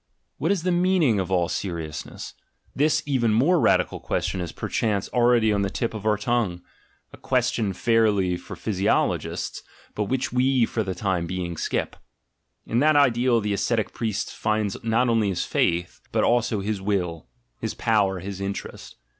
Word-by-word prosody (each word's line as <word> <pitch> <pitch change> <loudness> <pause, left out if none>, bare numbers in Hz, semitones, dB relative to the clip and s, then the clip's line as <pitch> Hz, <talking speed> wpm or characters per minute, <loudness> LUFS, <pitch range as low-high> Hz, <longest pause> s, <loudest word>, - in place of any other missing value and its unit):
"What 165 +6 +1
is 190 -5 0
the 180 - +1
meaning 175 - +3
of 95 - -2
all 90 -2 +2
seriousness?" 85 -5 -5 0.4
This 150 +2 +2
even 130 -6 +1
more 145 +11 +3
radical - - +2
question 95 - -2
is 85 - -4
per - - -5
chance 105 -3 0
already 120 -3 +3
on 100 - +1
the 100 - 0
tip 115 +3 -2
of 110 -1 -4
our 105 -1 +3
tongue: 110 -7 -1 0.5
a - - -11
question, 125 -5 0
fairly, 100 -3 +2
for 100 +3 -8
physiologists, 95 +2 -1 0.3
but 105 - -1
which 130 +5 -2
we 130 -1 +3
for 115 - -2
the 95 -3 -3
time 90 -2 -1
being 90 -1 -3
skip. - - -2 0.7
In 115 - 0
that 155 +2 +4
ideal 125 -4 +3
the 105 0 -1
ascetic 110 +2 0
priest 110 -4 -3
finds 105 -2 0
not 115 +2 +2
only 115 -3 +2
his 90 -2 -1
faith, 85 +1 0
but - - +1
also 120 -3 +2
his 100 0 -2
will, 90 -5 -2 0.3
his 110 - -4
power, 100 -5 +1
his 100 +1 -6
interest. 100 0 -6
110 Hz, 170 wpm, -24 LUFS, 95-120 Hz, 0.7 s, that